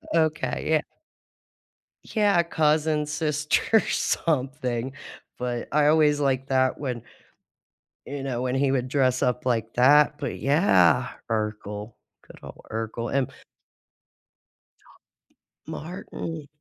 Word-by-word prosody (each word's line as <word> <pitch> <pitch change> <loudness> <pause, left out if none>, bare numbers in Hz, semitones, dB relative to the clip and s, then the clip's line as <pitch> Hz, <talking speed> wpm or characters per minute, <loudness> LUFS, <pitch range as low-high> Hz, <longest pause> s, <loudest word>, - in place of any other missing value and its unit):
Okay, 155 -2 0
yeah. 155 -1 +3 1.2
Yeah, 205 -5 +2
cousin, 155 -2 +1
sister, 150 +7 +1
something, 130 -4 -1 0.4
but 120 -1 -3
I 150 0 +3
always 150 -1 +4
liked 135 -2 0
that 130 -1 +2
when 125 -5 -3 1.1
You 140 -1 -5
know, 125 -3 -2
when 125 0 -1
he 135 0 +2
would 130 -2 0
dress 130 -2 +1
up 125 0 0
like 115 -3 0
that, 145 +4 +5
but - - -4
yeah, 135 - +3 0.2
Urkel. 105 -1 -3 0.3
Good - - -15
ol' - - -12
Urkel. 115 +2 -4
And 135 -3 +1 2.4
Martin. 160 -1 -7
135 Hz, 105 wpm, -25 LUFS, 125-150 Hz, 2.4 s, that